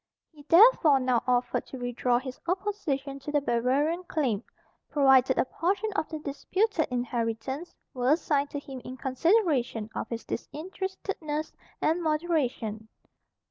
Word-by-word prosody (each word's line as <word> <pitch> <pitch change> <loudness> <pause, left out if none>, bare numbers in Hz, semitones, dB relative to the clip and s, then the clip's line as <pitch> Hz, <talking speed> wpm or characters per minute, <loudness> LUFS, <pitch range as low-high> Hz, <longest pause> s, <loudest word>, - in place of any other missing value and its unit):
He 305 -3 -16
therefore 335 - +7
now 255 -2 +2
offered 245 0 +1
to 265 - -8
withdraw 245 0 0
his 260 0 -6
opposition 335 -8 -2
to 275 +2 -6
the 295 - +3
Bavarian 280 +7 +1
claim, 250 - -1 0.5
provided 265 -2 +4
a - - +3
portion 385 +9 -1
of 360 - -1
the 315 - -4
disputed 315 +6 -1
inheritance 245 +4 -3 0.2
were 255 +1 +3
assigned 290 -3 0
to - - -5
him 270 -2 -9
in 255 - -8
consideration 265 - +1
of - - -4
his 230 -1 -5
disinterestedness 320 - -4 0.3
and 325 +3 +2
moderation. 295 -9 -1
280 Hz, 135 wpm, -28 LUFS, 250-330 Hz, 0.5 s, therefore